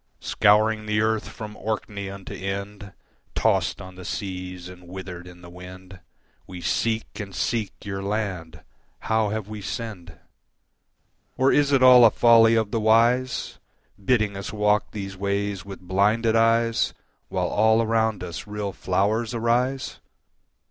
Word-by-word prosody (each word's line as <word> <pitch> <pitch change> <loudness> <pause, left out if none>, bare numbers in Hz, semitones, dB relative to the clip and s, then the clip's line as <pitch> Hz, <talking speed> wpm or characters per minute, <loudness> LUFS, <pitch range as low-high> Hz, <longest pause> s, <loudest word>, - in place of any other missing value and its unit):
Scouring 110 +1 +2
the 105 0 +1
earth 110 0 0
from 105 -1 -8
Orkney 105 -2 -4
unto 100 -1 -8
Ind, 100 +1 -5 0.4
Tossed - - +1
on 95 0 -10
the 90 0 -11
seas 90 -2 -5
and 90 -1 -13
withered 90 -1 -8
in 90 0 -13
the - - -10
wind, 90 +1 -12 0.5
We 90 -1 -8
seek 110 +5 -2
and 100 -3 -7
seek 110 -1 -1
your 95 -1 -4
land. 100 -5 -4 0.4
How 110 -1 +1
have 110 -1 -4
we 105 -1 -7
sinned? 105 -3 -6 1.2
Or 130 +1 +4
is 145 -1 +3
it 135 -2 +4
all 125 -1 +9
a 115 - +9
folly 115 0 +5
of 110 -2 0
the 115 - 0
wise, 115 +3 +2 0.4
Bidding 110 -2 +1
us 100 0 -6
walk 105 0 +1
these 100 -2 -6
ways 100 0 -2
with 100 -1 -9
blinded 105 +5 +1
eyes 115 0 +2 0.3
While - - -1
all 110 +1 +3
around 110 -3 0
us 90 +2 -7
real 105 -1 -4
flowers 105 +5 0
arise? 125 +3 0
105 Hz, 145 wpm, -24 LUFS, 95-115 Hz, 1.2 s, all